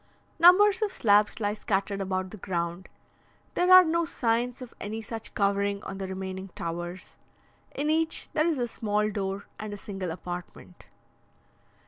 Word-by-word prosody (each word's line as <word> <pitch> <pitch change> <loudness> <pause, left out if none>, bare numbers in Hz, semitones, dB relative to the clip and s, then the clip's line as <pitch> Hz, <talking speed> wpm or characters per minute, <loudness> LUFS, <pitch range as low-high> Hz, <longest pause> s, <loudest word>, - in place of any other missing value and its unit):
Numbers 385 +5 +7
of 425 -2 +1
slabs 210 - +3
lie 205 -1 0
scattered 200 -1 -1
about 185 -1 -2
the 215 - -8
ground. 175 -1 -3 0.6
There 360 +1 +2
are 370 0 +11
no 335 +1 +1
signs 245 -5 -1
of 250 -3 -10
any 215 +2 -4
such 225 0 -7
covering 200 0 +1
on 195 - -6
the 190 - -3
remaining 190 0 -5
towers. 175 +3 -6 0.6
In 290 +2 -1
each 320 0 +1
there 310 +1 +2
is 325 -4 +1
a 245 -1 -1
small 210 -2 -1
door 195 -1 -3
and 210 -1 -5
a - - -9
single 195 -3 -5
apartment. 175 +1 -8
205 Hz, 155 wpm, -27 LUFS, 190-250 Hz, 0.6 s, are